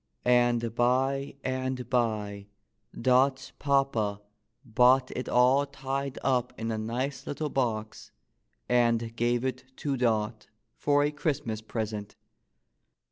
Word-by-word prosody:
— - - -42
and 120 -2 +3
by 135 +4 +1
and 130 -1 -2
by 105 -5 -1 0.5
Dot's 130 +2 +2
papa 135 -8 +1 0.5
bought 125 +3 +4
it 125 - -4
all 130 +3 +4
tied 135 0 -4
up 125 -3 0
in 115 0 -2
a 110 - -2
nice 125 +5 -3
little 150 +1 -3
box, 110 -4 -2 0.6
and 115 -2 +2
gave 120 +1 +1
it 130 0 -3
to 140 -2 -2
Dot 110 -2 0 0.3
for 145 0 +2
a 145 - +1
Christmas 140 -7 -2
present. 110 -2 -4
125 Hz, 120 wpm, -28 LUFS, 115-135 Hz, 0.6 s, bought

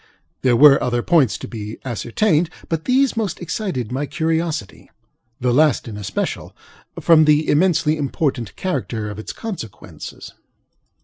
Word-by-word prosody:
There 125 -2 +3
were 140 +2 +7
other 120 -1 0
points 155 -9 +3
to - - -8
be 110 -1 -7
ascertained, 150 - 0 0.2
but 165 -1 -2
these 260 +1 +2
most 210 -7 -2
excited 165 - -3
my 140 +3 -2
curiosityŌĆöthe 160 - -2 0.5
last 130 +3 +2
in 110 - -6
especial, 105 -2 -4 0.4
from 160 -2 +5
the 150 +1 +3
immensely 160 -1 +2
important 135 -5 -2
character 115 - -3
of 105 - -8
its 110 - -6
consequences. 185 - -8
150 Hz, 130 wpm, -20 LUFS, 120-165 Hz, 0.5 s, were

